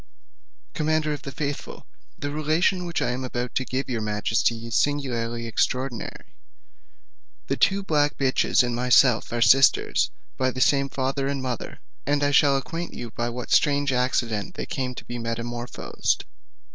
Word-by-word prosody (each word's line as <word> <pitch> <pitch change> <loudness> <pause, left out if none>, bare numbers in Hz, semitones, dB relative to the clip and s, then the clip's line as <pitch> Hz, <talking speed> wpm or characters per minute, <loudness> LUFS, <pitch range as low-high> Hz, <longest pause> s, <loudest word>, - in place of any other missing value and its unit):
Commander 155 0 0
of 145 - -6
the 140 - -7
faithful, 145 +1 -5 0.3
the 145 - -4
relation 160 +5 +1
which 170 - -1
I - - 0
am 130 +1 -3
about 125 -1 -3
to 130 - 0
give 130 +2 -3
your 120 -3 -2
majesty 110 +2 0
is 115 - -6
singularly 120 -5 0
extraordinary. 125 +1 -2 1.1
The - - -1
two 195 0 +2
black 150 -5 +1
bitches 130 -2 +3
and 120 -1 -1
myself 125 -1 +4
are 120 0 +2
sisters 135 +5 +4 0.3
by 130 0 +2
the 130 - -5
same 140 +1 +3
father 135 +1 -1
and 140 0 -1
mother; 125 -3 -5 0.3
and 145 0 +2
I 145 - +2
shall 140 -1 +5
acquaint 165 +5 -5
you 120 -2 -6
by 120 +1 -2
what 120 +1 -6
strange 145 -2 +3
accident 120 -4 0
they - - -4
came 130 -1 -3
to - - -9
be 120 0 -5
metamorphosed. 120 +1 -2
130 Hz, 160 wpm, -25 LUFS, 120-145 Hz, 1.1 s, shall